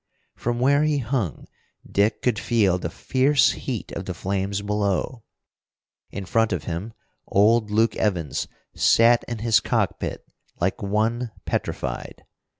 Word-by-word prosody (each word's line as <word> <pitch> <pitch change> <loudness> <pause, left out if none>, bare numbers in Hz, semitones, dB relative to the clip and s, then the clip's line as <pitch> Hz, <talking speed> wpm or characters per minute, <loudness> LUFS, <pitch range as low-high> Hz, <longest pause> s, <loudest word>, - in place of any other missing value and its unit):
From 120 0 -2
where 140 +3 +4
he 155 -1 +2
hung, 115 - -2 0.4
Dick 105 +2 +1
could 120 -3 +1
feel 100 -8 +2
the 85 - -3
fierce 130 - +2
heat - - -5
of - - -5
the - - -4
flames 100 +1 -2
below. 105 +3 -1 0.9
In 100 -1 -6
front 115 +3 +1
of 85 -5 -2
him, 85 +8 -5 0.3
old 110 +2 +3
Luke 110 +2 +2
Evans 85 -9 -1 0.3
sat 115 +1 +4
in 120 - -4
his 110 -4 +5
cockpit - - -2 0.3
like 90 +2 -1
one 110 +4 0 0.2
petrified. 65 -2 -4
110 Hz, 135 wpm, -24 LUFS, 95-120 Hz, 0.9 s, his